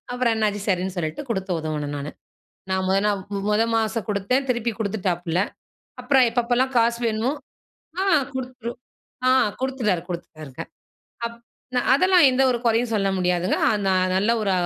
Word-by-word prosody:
அப்பறம் 245 -2 +1
என்னாச்சு. 210 -2 0
சரின்னு 185 0 0
சொல்லிட்டு 160 - -3
குடுத்து 190 -3 -2
உதவுனேன் 150 -2 -3
நானு. 145 +1 -5 0.6
நான் 190 0 0
முத 190 - +3
நாள் 200 -2 0
மு 200 - -1
முத 210 +2 +3
மாசம் 225 0 -1
குடுத்தேன். 215 +7 0
திருப்பி 240 -1 0
குடுத்துட்டாப்ல. 180 -5 -1 0.6
அப்பறம் 265 -4 +4
எப்பப்பல்லாம் 245 +2 +1
காசு 235 0 +2
வேணுமோ, 225 +4 0 0.7
ஆ - - +2 0.3
குடுத்துரு 250 -2 -5 0.6
ஆ - - +6 0.3
குடுத்துட்டாரு 245 -10 0
குடுத்துட்டாருங்க. 155 -6 -7 0.6
அப் 235 0 -8 0.4
ந - - +5 0.2
அதெல்லாம் 365 +1 +5
எந்த 260 +1 +2
ஒரு 240 - -1
கொறையும் 230 +1 +2
சொல்ல 195 -2 +1
முடியாதுங்க. 180 0 +1
அ - - +3 0.2
ந - - +3 0.3
நல்ல 205 +4 +2
ஒரு 195 - +1
215 Hz, 150 wpm, -23 LUFS, 185-245 Hz, 0.7 s, ஆ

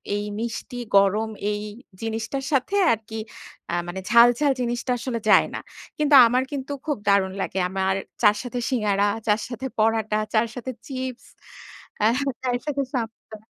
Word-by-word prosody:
এই 205 - -2 0.2
মিষ্টি 235 +1 -5 0.2
গরম 205 +3 +3 0.2
এই 205 0 -3 0.4
জিনিসটার 225 +4 -3
সাথে 275 +7 +1 0.2
আরকি 220 0 -6 0.5
আ - - +2
মানে 190 +2 -5
ঝাল, 235 +1 +8
ঝাল 295 -2 +3
জিনিসটা 240 +1 -2
আসলে 235 -1 -3
যায় - - +6
না। - - -3 0.4
কিন্তু 300 -1 +4
আমার 250 +2 +2
কিন্তু 280 0 -4
খুব 295 -3 -1
দারুণ 195 -2 +3
লাগে। 190 - -2
আমার 190 0 0 0.3
চা'র 210 -1 +5
সাথে 245 0 -4
সিঙ্গাড়া, 205 -5 +1 0.2
চা'র 210 +1 +3
সাথে 245 +2 -4
পরাটা, 220 -1 +2
চা'র 225 +1 +3
সাথে 250 +1 -5 0.2
চিপস, 260 -2 -5 0.7
অ্যা 215 +1 +4 0.3
চায়ের 245 -1 -1
সাথে 280 -2 0
সাপটা। 225 -2 -5
230 Hz, 155 wpm, -24 LUFS, 210-255 Hz, 0.7 s, ঝাল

